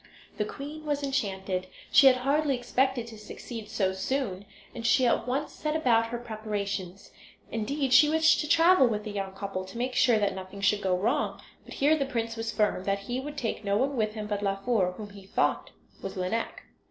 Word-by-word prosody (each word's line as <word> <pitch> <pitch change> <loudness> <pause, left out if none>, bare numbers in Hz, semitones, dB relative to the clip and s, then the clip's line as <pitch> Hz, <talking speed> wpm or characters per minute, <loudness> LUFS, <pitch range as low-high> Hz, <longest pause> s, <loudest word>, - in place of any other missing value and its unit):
The 210 - 0
queen 295 +6 -7
was 290 -1 -2
enchanted. 190 -8 -2 0.2
She 275 - +8
had 260 - +7
hardly 280 +2 +1
expected 250 0 0
to 225 -2 -11
succeed 215 +1 -8
so 195 -3 0
soon, 200 -1 -2 0.3
and 235 - -7
she 255 +2 +4
at 240 - +1
once 275 +4 -1
set 305 0 -3
about 235 -7 +3
her 240 +1 -4
preparations. 205 -5 -5 0.4
Indeed 260 +4 -1
she 295 +3 +7
wished 320 +1 +4
to 300 - -3
travel 330 -4 +6
with 210 -2 -2
the 210 - -5
young 195 -2 -4
couple, 195 -1 -4
to 190 +5 -10
make 250 +2 -2
sure 245 -4 +4
that 205 -1 +1
nothing 190 +1 -8
should 205 +1 +2
go 185 -2 +1
wrong; 235 +10 0 0.3
but - - -10
here 295 +3 +4
the 275 -3 -1
prince 230 -3 -2
was 225 0 -3
firm, 210 -4 0
that 200 0 0
he 245 +5 -3
would 290 +2 -7
take 225 -4 -3
no 200 0 +1
one 275 +4 0
with 215 -2 -1
him 215 -1 -4
but 205 -1 -2
Laufer, 195 -1 0
whom 210 -2 -8
he 200 -1 -13
thought - - 0 0.3
was - - -6
Lineik. 185 +5 -2
225 Hz, 205 wpm, -28 LUFS, 200-265 Hz, 0.4 s, She